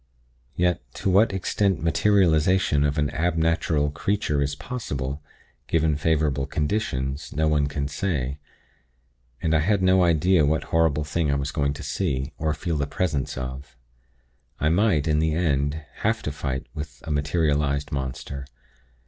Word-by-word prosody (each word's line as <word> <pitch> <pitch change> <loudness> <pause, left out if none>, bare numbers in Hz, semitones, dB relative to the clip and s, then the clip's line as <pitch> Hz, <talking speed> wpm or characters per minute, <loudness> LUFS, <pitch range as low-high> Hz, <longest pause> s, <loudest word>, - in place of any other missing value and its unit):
Yet, 90 -1 +1
to 95 - 0
what 105 +5 +5
extent 95 -1 0
materialization 85 -3 +3
of 75 +1 0
an 75 -1 +1
ab 85 +3 0
natural 80 -2 +1
creature 75 -2 0
is 70 0 -1
possible, 70 - -4 0.5
given 80 -2 +2
favorable 75 -2 +1
conditions, 70 -4 -2
no 80 0 +2
one 75 -2 +2
can 70 0 -3
say; 70 -3 -2 1.0
and 80 - +1
I 80 - +4
had 95 +4 +1
no 95 0 +5
idea 85 0 +4
what 75 +2 +1
horrible 80 -2 +3
thing 75 +1 -1
I 70 - +2
was 70 0 -2
going 70 -2 0
to - - -8
see, 70 -6 -2
or 80 -1 0
feel 80 +1 -2
the 70 -1 -1
presence 75 -5 -2
of. 65 +2 -6 0.8
I 75 - +2
might, 85 -4 +2
in 75 -1 +2
the 80 0 +1
end, 75 -3 +1 0.2
have 110 +1 0
to 75 - -2
fight 70 -2 -3
with 75 -4 -8
a 80 - -4
materialized 75 -1 0
monster. 70 0 -4
75 Hz, 155 wpm, -24 LUFS, 70-85 Hz, 1.0 s, what